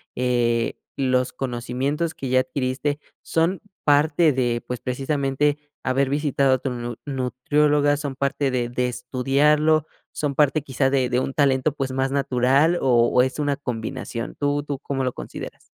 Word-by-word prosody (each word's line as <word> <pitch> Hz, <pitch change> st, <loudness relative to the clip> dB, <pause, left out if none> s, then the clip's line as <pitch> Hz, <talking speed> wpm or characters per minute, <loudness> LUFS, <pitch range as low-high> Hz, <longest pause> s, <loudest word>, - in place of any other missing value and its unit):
eh, 120 Hz, -2 st, +1 dB, 0.2 s
los 130 Hz, -2 st, +1 dB
conocimientos 135 Hz, +6 st, -2 dB
que 135 Hz, -, -5 dB
ya 130 Hz, 0 st, +4 dB
adquiriste, 135 Hz, +3 st, -2 dB, 0.2 s
son 165 Hz, +3 st, 0 dB, 0.2 s
parte 150 Hz, +2 st, +4 dB
de, 120 Hz, -3 st, 0 dB
pues, 125 Hz, -1 st, -4 dB
precisamente, 140 Hz, +2 st, 0 dB, 0.3 s
haber 135 Hz, +1 st, +1 dB
visitado 140 Hz, -2 st, +2 dB
a -, -, +3 dB
tu 135 Hz, -, -3 dB
nu 120 Hz, -1 st, -5 dB
nutrióloga, 145 Hz, +2 st, +1 dB
son 145 Hz, -3 st, -4 dB
parte 140 Hz, 0 st, 0 dB
de 120 Hz, -2 st, -1 dB
de 125 Hz, +1 st, 0 dB
estudiarlo, 140 Hz, +5 st, +2 dB, 0.3 s
son 145 Hz, -2 st, -2 dB
parte 150 Hz, 0 st, +3 dB
quizá 135 Hz, -1 st, 0 dB
de 130 Hz, -2 st, +1 dB
de 125 Hz, -, +1 dB
un 135 Hz, -, -2 dB
talento, 140 Hz, 0 st, +2 dB
pues, 135 Hz, -3 st, -3 dB
más 135 Hz, +1 st, 0 dB
natural 140 Hz, +4 st, +2 dB
o 120 Hz, -3 st, +4 dB
o 125 Hz, -, +4 dB
es 130 Hz, +3 st, -1 dB
una 145 Hz, -2 st, 0 dB
combinación? 120 Hz, -2 st, -5 dB
¿Tú 145 Hz, 0 st, 0 dB
tú 145 Hz, -2 st, -4 dB
cómo 135 Hz, -1 st, -3 dB
lo 130 Hz, -, 0 dB
consideras? -, -, -8 dB
135 Hz, 160 wpm, -23 LUFS, 125-145 Hz, 0.3 s, ya